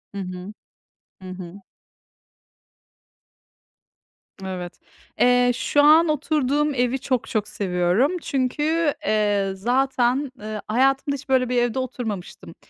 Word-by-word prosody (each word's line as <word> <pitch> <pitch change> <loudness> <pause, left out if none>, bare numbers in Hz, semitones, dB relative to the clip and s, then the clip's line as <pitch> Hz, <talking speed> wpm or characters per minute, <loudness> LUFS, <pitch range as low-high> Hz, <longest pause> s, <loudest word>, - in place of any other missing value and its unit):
Hı 200 - -3
hı. 185 +2 -7 0.7
Hı 185 - -9
hı. 185 +1 -9 2.8
Evet. 180 -2 -6 0.4
Eee, 245 0 +4
şu 290 - +2
an 315 +3 +6
oturduğum 295 -1 0
evi 250 +2 0
çok 255 -3 -2
çok 215 -1 -1
seviyorum. 185 - +1
Çünkü, 295 +4 0
eee, 205 -2 +1
zaten, 255 +4 +1
ııı, 215 0 -6
hayatımda 270 +5 +1
hiç 280 0 -11
böyle 255 -2 +2
bir 250 - 0
evde 240 +2 0
oturmamıştım. 230 -7 -6
245 Hz, 110 wpm, -23 LUFS, 205-275 Hz, 2.8 s, an